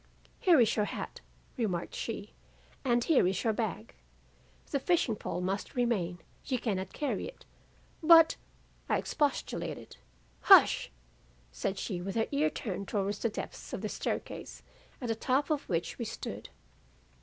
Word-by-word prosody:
"'Here 345 -6 +5
is 230 -2 +4
your 210 - +2
hat,' - - -6 0.4
remarked 190 -8 -1
she, 215 -2 -5 0.5
'and 240 -3 +2
here 280 - +4
is 190 0 -1
your 225 - +2
bag. 205 - -3 0.8
The 280 - +1
fishing 285 -6 +2
pole 180 - -4
must 190 +2 -3
remain, 210 -8 0 0.3
you 260 - -1
cannot 195 -5 -2
carry 295 - -2
it.' - - -12 0.6
"'But, 330 0 +8 0.3
' - - -33
I - - +3
expostulated. 290 -3 -2 0.4
"'Hush!' - - +7 0.6
said 190 - -2
she 185 -4 -3
with 195 +2 -4
her 225 -1 +2
ear 295 +2 +2
turned 200 -8 -5
towards 200 0 -1
the 230 - +1
depths - - -7
of - - -3
the - - -2
staircase - - -4 0.4
at 245 - -4
the - - +3
top 265 +6 0
of 295 -2 -1
which 170 +6 -2
we 235 - -2
stood. 225 - -6
225 Hz, 155 wpm, -31 LUFS, 195-275 Hz, 0.8 s, But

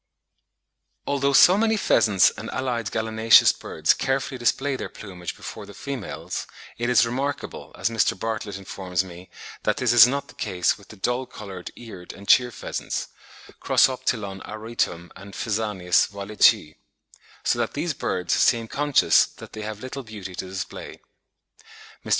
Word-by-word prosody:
Although 140 0 +1
so 180 +8 +7
many 220 0 +2
pheasants 100 - +4
and - - -8
allied 120 -4 -2
gallinaceous 110 0 +5
birds - - 0
carefully 135 -1 -2
display 135 +3 +1
their - - -5
plumage 90 -4 -8
before - - -8
the - - -12
females, 140 -7 -5 0.3
it 120 +1 0
is 125 -1 +5
remarkable, 135 +4 -4
as 105 - 0
Mr. 110 -4 +1
Bartlett 110 -2 -3
informs 95 -2 -3
me, 90 0 -12 0.3
that - - 0
this - - +2
is 120 -1 +9
not 140 +2 -2
the - - -14
case 90 -2 0
with 100 - -18
the - - -12
dull 125 +6 -1
coloured 95 -4 -8
Eared 105 -7 -10
and 100 0 -13
Cheer 125 -2 +5
pheasants 115 - -5 0.5
(Crossoptilon 105 -7 +1
auritum 110 -6 -3
and 100 +1 -11
Phasianus 105 -6 +1
wallichii); 100 -6 +2 0.7
so - - +1
that - - -1
these - - -1
birds 90 -2 -2
seem 115 -1 +3
conscious 145 +3 +3
that - - -14
they 110 - -6
have 105 0 -6
little 130 +2 -6
beauty 105 -6 -9
to 95 - -5
display. 95 0 -7 1.0
Mr. - - -9
110 Hz, 150 wpm, -24 LUFS, 95-125 Hz, 1.0 s, is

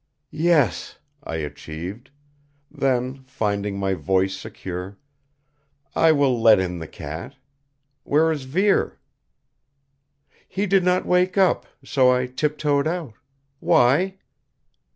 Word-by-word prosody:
"Yes," 155 - +1 0.3
I 80 - -5
achieved. 80 - -7 0.6
Then, 130 0 -1
finding 105 -5 -2
my 95 -1 0
voice 95 +1 0
secure: 95 -2 -7 1.0
"I 165 0 +5
will 140 -6 +2
let 110 -2 +7
in 90 -2 -2
the 80 - -7
cat. - - -8 0.7
Where 160 +3 +2
is 145 -4 -4
Vere?" 190 +9 +1 1.5
"He 200 +2 -1
did 195 -1 +3
not 180 0 +2
wake 180 +1 +2
up, 190 -1 +3 0.2
so 130 -3 +3
I 125 0 +1
tiptoed 145 +2 0
out. 160 -8 -3 0.5
Why?" 160 +13 +3
130 Hz, 110 wpm, -23 LUFS, 100-160 Hz, 1.5 s, let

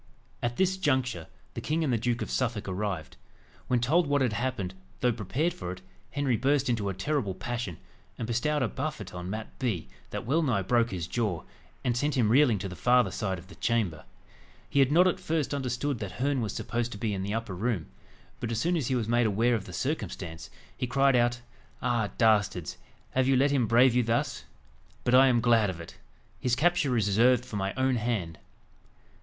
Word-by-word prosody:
At 120 0 -2
this 190 0 +2
juncture, 130 - 0 0.3
the - - -5
king 160 +2 0
and 135 -5 +1
the - - +3
Duke 120 +1 0
of - - -6
Suffolk 115 -4 -1
arrived. 95 -4 -3 0.5
When 125 - +2
told 150 +7 +3
what 145 0 +2
had 120 -4 +1
happened, 110 -5 -2 0.3
though 125 - +3
prepared 120 - -1
for 90 -1 -6
it, 95 - -12 0.3
Henry 140 -5 0
burst 140 +1 +2
into 110 -4 0
a - - -2
terrible 105 -2 -1
passion, 120 -6 -4 0.4
and 115 - -3
bestowed 130 +5 0
a - - +2
buffet 130 -6 -5
on 90 0 -6
Mat 110 +2 -6
Bee, 100 - -2 0.2
that - - -5
well 150 +8 +2
nigh 120 -11 +1
broke 115 +4 +2
his 90 -5 -3
jaw, 100 -3 -2 0.4
and 125 -2 +1
sent 145 +3 0
him 115 -4 +3
reeling 130 -4 +5
to 95 - -4
the 90 - -7
farther 125 +3 +3
side 95 -4 -2
of 85 - -11
the 100 - -14
chamber. 105 -10 -1 0.6
He 140 - 0
had 135 0 +4
not 175 +4 +6
at 185 - +1
first 155 -3 -1
understood 135 -1 -2
that 100 -4 -5
Herne 135 +5 0
was 110 - -2
supposed 115 +2 -2
to - - -7
be 105 0 -1
in 95 - -2
the 100 +3 -2
upper 115 -4 -3
room; 100 -2 -1 0.5
but 120 - -3
as 115 - -1
soon 175 +8 +1
as 150 -8 -1
he 130 - +1
was 115 -3 -1
made 120 0 +3
aware 115 +4 +2
of 110 -4 -1
the - - -9
circumstance, 90 - -4 0.3
he 125 - -2
cried 135 +1 +3
out 120 0 +2 0.4
"Ah, 120 -4 0
dastards! 105 -7 +2 0.3
have 130 0 +2
you 135 - +4
let 140 +2 +3
him 130 -5 +2
brave 120 +3 +5
you 125 - +4
thus? 115 0 -1 0.6
But 120 - +1
I 130 +1 +8
am 120 -2 +3
glad 115 -3 +4
of 90 -3 -5
it. 85 - -11 0.4
His 125 -1 +1
capture 145 -4 +2
is 110 - +2
reserved 120 +5 +4
for 105 - -5
my 95 0 -1
own 130 -1 +2
hand." 105 -9 -2
120 Hz, 210 wpm, -28 LUFS, 105-130 Hz, 0.6 s, I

